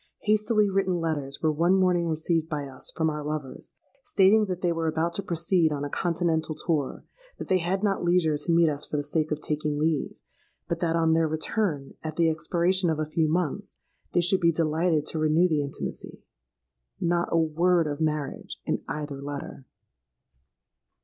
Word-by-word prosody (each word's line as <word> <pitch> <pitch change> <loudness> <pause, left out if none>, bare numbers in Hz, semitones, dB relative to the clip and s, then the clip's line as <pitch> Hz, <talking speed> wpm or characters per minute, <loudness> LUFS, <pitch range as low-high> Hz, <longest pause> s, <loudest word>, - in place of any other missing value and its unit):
Hastily 215 0 +2
written 195 -2 +1
letters 145 -4 -3
were 155 - +3
one 170 +5 +3
morning 180 -2 +2
received 160 0 0
by 150 -3 -3
us 130 -1 -7
from 160 - -1
our 150 0 -5
lovers, 150 -3 -6 0.3
stating 210 0 +4
that 180 -1 -4
they 175 - +1
were 165 -1 -1
about 160 +2 0
to 200 - -1
proceed 170 -2 +1
on 145 -1 -2
a 145 - -6
continental 165 -2 0
tour; 155 -3 -2 0.3
that - - -7
they 185 - +3
had 185 +4 -1
not 200 -3 +1
leisure 175 -3 +3
to 150 +3 -1
meet 170 0 +5
us 145 -1 -1
for 150 - -3
the 145 - -1
sake 155 +1 -1
of 150 0 -2
taking 150 -1 -2
leave; 155 0 -1 0.5
but 170 - -2
that, 165 -1 0
on 165 -1 +3
their 165 0 +3
return 155 -2 -2
at 155 -1 -5
the 165 -1 +3
expiration 175 +3 +1
of 160 - 0
a 155 - -1
few 155 0 0
months, 180 +4 -2 0.4
they 175 - +4
should 185 +2 +3
be 170 -1 +4
delighted 160 -1 +1
to 160 - -2
renew 155 +3 +3
the 155 -4 +1
intimacy. 140 -1 -6 0.8
Not 175 0 0
a - - +3
word 165 +2 +2
of 145 0 -4
marriage 150 -3 -3
in - - -1
either 145 -2 -5
letter! 140 -1 -7
160 Hz, 185 wpm, -26 LUFS, 150-175 Hz, 0.8 s, meet